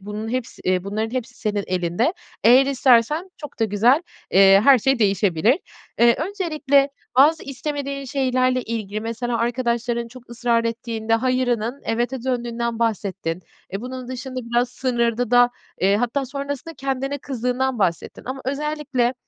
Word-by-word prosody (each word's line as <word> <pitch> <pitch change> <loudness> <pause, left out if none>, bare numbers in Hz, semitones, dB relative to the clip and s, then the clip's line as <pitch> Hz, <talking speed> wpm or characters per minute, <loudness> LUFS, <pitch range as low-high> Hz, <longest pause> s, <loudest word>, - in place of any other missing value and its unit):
bunun 210 +3 -6
hepsi 250 0 -4
eee, 185 0 +1
bunların 215 +3 -2
hepsi 250 -1 -4
senin 210 -4 -2
elinde. 180 - 0 0.3
Eğer 255 +4 +7
istersen 275 +5 +3
çok 295 -2 -10
da 225 - +4
güzel, 230 - +3 0.3
eee, 195 +1 +7
her 275 -3 +7
şey 270 +3 +1
değişebilir. 200 - +2 0.4
Eee, 235 0 +6
öncelikle 305 -6 +1 0.3
bazı 300 +5 +5
istemediğin 280 0 -4
şeylerle 255 -1 +1
ilgili, 215 -3 -4
mesela, 230 +1 -3
arkadaşların 235 0 -1
çok 245 0 -15
ısrar 235 -1 +1
ettiğinde 230 -1 -2
"hayır"ının 250 0 0
"evet"e 240 +2 -2
döndüğünden 235 -2 -2
bahsettin. 195 -6 -2 0.3
E, 195 - -3
bunun 255 +1 -7
dışında 255 0 -5
biraz 240 +1 0
sınırdı 240 -2 -1
da, 245 0 +5 0.3
eee, 195 +2 +3
hatta 245 +4 -1
sonrasında 280 +4 -5
kendine 270 +1 -3
kızdığından 255 0 -2
bahsettin 180 -5 -1
ama 265 +1 -5
özellikle, 280 -2 -1
245 Hz, 140 wpm, -22 LUFS, 225-265 Hz, 0.4 s, Eğer